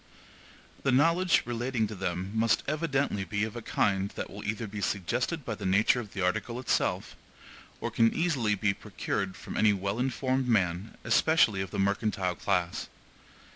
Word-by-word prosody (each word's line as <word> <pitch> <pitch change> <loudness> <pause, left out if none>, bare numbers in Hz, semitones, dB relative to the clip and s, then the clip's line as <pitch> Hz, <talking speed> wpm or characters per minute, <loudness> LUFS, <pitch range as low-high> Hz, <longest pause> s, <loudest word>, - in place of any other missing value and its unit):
The 135 - +1
knowledge 165 +7 +4
relating 120 -1 -1
to 110 - -6
them 90 0 -3
must 110 0 +2
evidently 140 -8 0
be 105 +3 -2
of 110 0 -3
a 120 - -5
kind 100 -2 +1
that - - -5
will 100 +1 -8
either 110 +2 -2
be 105 0 -6
suggested 120 - -1
by 110 - -2
the - - -8
nature 105 +6 +4
of 110 -4 -8
the 95 - -2
article 115 +6 -1
itself, 125 -2 0 0.6
or - - -3
can 115 0 +4
easily 135 -11 +1
be 100 0 +1
procured 95 -1 -3
from - - -8
any 105 -1 +4
well 100 +3 -2
informed 130 0 0
man, 95 -3 0
especially 120 - +3
of 95 - -4
the - - -5
mercantile 100 -1 0
class. 90 -1 -1
110 Hz, 170 wpm, -29 LUFS, 100-125 Hz, 0.6 s, knowledge